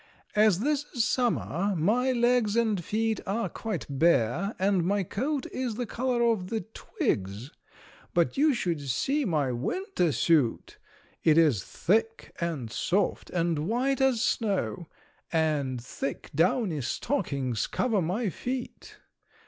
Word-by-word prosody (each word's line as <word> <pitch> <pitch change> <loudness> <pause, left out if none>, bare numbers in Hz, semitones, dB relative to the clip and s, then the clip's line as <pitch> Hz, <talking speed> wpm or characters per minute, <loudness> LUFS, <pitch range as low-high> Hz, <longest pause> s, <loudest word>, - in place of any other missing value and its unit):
As 210 -3 +4
this 295 +2 +1
is 235 -2 +2
summer 205 - 0
my 235 +11 +2
legs 240 -3 +2
and 220 -6 +1
feet 220 +2 0
are 225 +4 0
quite 215 -8 -4
bare 165 - +2
and 190 -2 +2
my 200 +3 +1
coat 265 - -2
is 250 -4 -3
the 245 +2 -2
color 245 +1 0
of 220 -6 +1
the 225 -1 -1
twigs, 115 - -3 0.6
but 170 -1 +1
you 300 +3 +4
should 170 -9 -1
see 265 - 0
my 150 -8 +1
winter 180 - -1
suit! 140 -2 +1 0.4
It 155 -1 +5
is 145 - +4
thick 225 +4 -1
and 150 -10 -3
soft 185 - 0
and 165 -3 0
white 260 +4 0
as 260 -4 +3
snow, 195 -5 -1 0.4
and 150 -6 0
thick 130 +2 -5
downy 170 - +1
stockings 135 - -1
cover 225 -6 0
my 195 +7 -1
feet. 250 +5 -6
195 Hz, 130 wpm, -28 LUFS, 155-235 Hz, 0.6 s, It